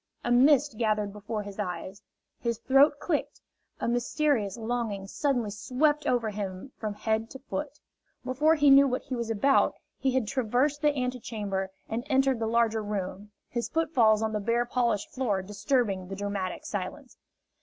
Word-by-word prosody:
A 240 - -1
mist 270 0 +4
gathered 210 -3 0
before 210 +1 -4
his 200 0 -9
eyes, 190 0 -4 0.4
his 235 -2 -1
throat 270 +5 +5
clicked, 300 0 -2 0.4
a - - -2
mysterious 240 -3 0
longing 225 -4 -2
suddenly 245 -1 -1
swept 265 +9 0
over 230 -3 +1
him 195 +4 -5
from 215 -2 -4
head 220 +1 -1
to - - -9
foot. 290 +2 -5 0.5
Before 295 +5 +3
he 290 -2 +5
knew 275 +1 +8
what 255 -1 -2
he 265 - -4
was 235 -1 -3
about 225 +6 +3 0.2
he 270 - +1
had 260 -3 +1
traversed 260 +4 0
the 295 -2 +2
antechamber 215 -6 -3 0.2
and 225 +2 -3
entered 265 -2 +3
the 225 - -1
larger 225 -1 +2
room, 205 -1 -4 0.2
his 235 -1 -3
footfalls 245 -10 +3
on 220 0 -1
the 210 - 0
bare 235 +3 +1
polished 240 -4 0
floor 210 -8 0
disturbing 210 -2 0
the 195 - -5
dramatic 200 -2 -3
silence. 205 +7 -5
235 Hz, 165 wpm, -28 LUFS, 210-265 Hz, 0.5 s, knew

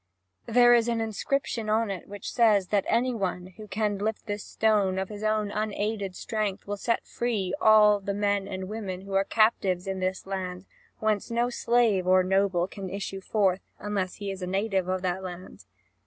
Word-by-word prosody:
There 240 +1 +6
is 235 -1 +4
an 235 -1 0
inscription 225 +1 -2
on 220 -1 +1
it 185 -3 -6
which 205 0 -7
says 210 -6 +4
that 205 -2 +1
any 245 +2 +2
one 185 -3 -3
who 215 -1 -9
can 205 -1 -1
lift 215 +1 -2
this 205 -1 -4
stone 205 -4 +1
of 190 0 -2
his 210 0 -7
own 215 -1 0
unaided 210 -2 -2
strength 210 -3 -3
will 205 - -3
set 230 +3 -1
free 210 -6 -2
all 210 -1 +6
the 200 0 -3
men 205 -1 0
and 185 -1 -5
women 195 -3 -5
who 195 0 -8
are 195 0 +3
captives 195 -4 +2
in 190 -1 -3
the 185 0 -1
land, 185 -1 -5 0.3
whence 215 -1 0
no 235 +1 0
slave 230 -7 +2
or 185 0 +5
noble 190 -1 +2
can 195 -1 -7
issue 195 0 -5
forth, 195 -2 +1 0.2
unless 200 -3 -3
he 200 -1 -4
is 190 -1 -7
a 180 - -3
native 195 -1 0
of 185 0 -1
that 185 +1 -1
land. 185 0 -9
200 Hz, 190 wpm, -27 LUFS, 190-215 Hz, 0.3 s, There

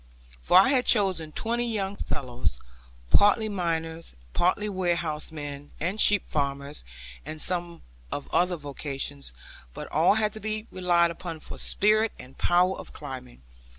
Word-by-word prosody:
For 175 - +5
I 195 - +5
had 260 -3 +2
chosen 185 -8 +2
twenty 235 +6 -1
young 200 -2 -2
fellows, 125 - -3 0.5
partly 205 +2 +5
miners, 165 -4 -3
and - - -25
partly 185 +4 +2
warehousemen, 155 -6 -2
and 185 +7 -1
sheep 205 -1 +5
farmers, 140 0 -2 0.4
and 155 - -7
some 175 0 -1 0.3
of 145 - -4
other 180 0 +3
vocations, 135 - -5 0.4
but - - -6
all 165 +7 +4
to 215 0 0
be 215 0 -3
relied 175 -2 +3
upon 170 -1 -6
for - - -9
spirit 215 +2 +2
and 130 +1 -12
power 180 +2 +3
of - - -8
climbing. 130 - -9
170 Hz, 140 wpm, -27 LUFS, 145-200 Hz, 0.5 s, For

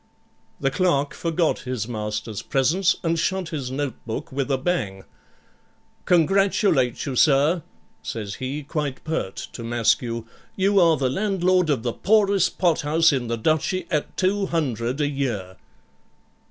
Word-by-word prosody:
The 135 - 0
clerk 145 -4 +1
forgot 165 -1 0
his 125 -4 -4
master's 105 -2 -4
presence 160 +8 +2
and 165 -1 +1
shut 190 +1 -1
his 140 -5 -4
notebook 130 -4 -4
with 135 +1 -2
a 135 - +2
bang, 120 - -2 1.0
'Congratulate 180 - +2
you, 135 - -3
sir,' 150 +6 +4 0.4
says 105 -3 -5
he, 140 +3 -3
quite 145 -2 -3
pert 155 -12 -3 0.2
to 115 - -7
Maskew; 115 0 0 0.3
'you 200 +1 +3
are 165 -3 +5
the 135 - +1
landlord 185 +2 +1
of 130 -6 +1
the 120 -2 -1
poorest 200 -2 +2
pothouse 165 -2 +3
in 125 -3 -1
the 115 0 -1
Duchy 160 - 0
at 150 -2 -2
200 160 - 0
a 145 - +2
year.' 115 -10 -3
145 Hz, 135 wpm, -23 LUFS, 125-175 Hz, 1.0 s, are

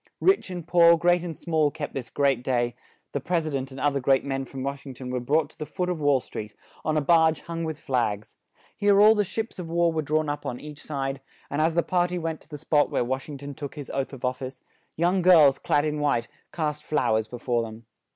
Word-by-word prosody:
Rich 385 - +3
and 175 -3 -6
poor, 170 -1 +6
great 175 +1 +3
and 165 -3 -5
small, 155 -3 +1
kept 150 0 -6
this 125 -4 -5
great 135 -3 +1
day; 120 -2 0 0.4
the 145 - -2
pres 170 +2 0
i 155 - -3
dent 135 -1 -2
and 135 0 -9
oth 145 +1 +1
er - - 0
great 135 +1 +2
men 135 -1 -2
from 130 0 -7
Wash 140 0 -4
ing 135 -2 -9
ton 125 0 -7
were 125 - -1
brought 150 +5 +1
to - - -22
the 155 - -4
foot 180 0 -2
of 175 -3 -2
Wall 145 -2 +4
Street, 105 -4 -8 0.3
on 155 0 0
a - - +3
barge 160 +1 +4
hung 165 0 -5
with 160 -2 -4
flags; 110 -5 -1 0.4
here 205 -1 +4
all 215 +1 +8
the 210 -1 +2
ships 220 +2 -4
of 170 -2 -6
war 170 0 +2
were 160 - 0
drawn 155 +1 0
up 145 0 -3
on 125 - -4
each 150 0 -10
side; 135 -2 -3 0.3
and 145 - 0
as 160 +1 +2
the 170 - +3
par 175 -1 +1
ty 180 0 -4
went 165 -2 -3
to - - -19
the 150 - -7
spot 145 +1 +2
where - - 0
Wash 130 +4 -3
ing 145 - -6
ton 140 +1 -7
took 140 +1 -7
his 145 -3 -7
oath 135 -1 -2
of 135 -2 -6
of 125 0 0
fice, 130 0 -8 0.3
young 175 +3 +2
girls, 155 -7 +6
clad 145 +1 +1
in 150 -1 -1
white, 140 -6 +1 0.2
cast 150 -2 -2
flow 150 -7 +1
ers 110 0 0
be 125 - -7
fore 120 0 0
them. 115 0 -8
145 Hz, 260 wpm, -26 LUFS, 135-165 Hz, 0.4 s, all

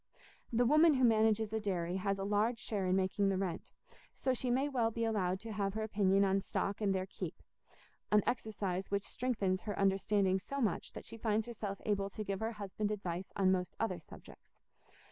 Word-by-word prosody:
The 240 +1 +3
woman 305 +4 +6
who 260 - +2
manages 220 -2 +3
a 220 - +1
dairy 180 -4 -1
has 195 +1 0
a 195 - -3
large 210 +4 +1
share 205 -4 -2
in 185 - +3
making 195 +1 +1
the 195 - +1
rent, 185 -3 -3 0.5
so 260 - 0
she 250 0 -2
may 265 +4 +2
well 245 -5 +1
be 230 +1 -3
allowed 190 -4 0
to 225 - -6
have 200 -1 -1
her 220 - -1
opinion 200 -2 +3
on 195 0 +2
stock 195 +2 -2
and 205 -2 +2
their 190 -1 0
"keep"—an 210 +1 -4
exercise 200 -5 -2
which 200 0 0
strengthens 200 -7 -1
her 205 - -4
understanding 195 0 +2
so 275 +9 -5
much 215 -9 -1
that - - -8
she 230 - -8
finds 220 -1 0
herself 210 -4 -5
able 200 -2 0
to 215 +2 -5
give 195 -1 -3
her 225 +1 -2
husband 205 0 -3
advice 185 -3 -4
on 190 -2 +3
most 180 -1 -1
other 185 -6 -1
subjects. 160 - -15
205 Hz, 200 wpm, -34 LUFS, 190-225 Hz, 0.5 s, woman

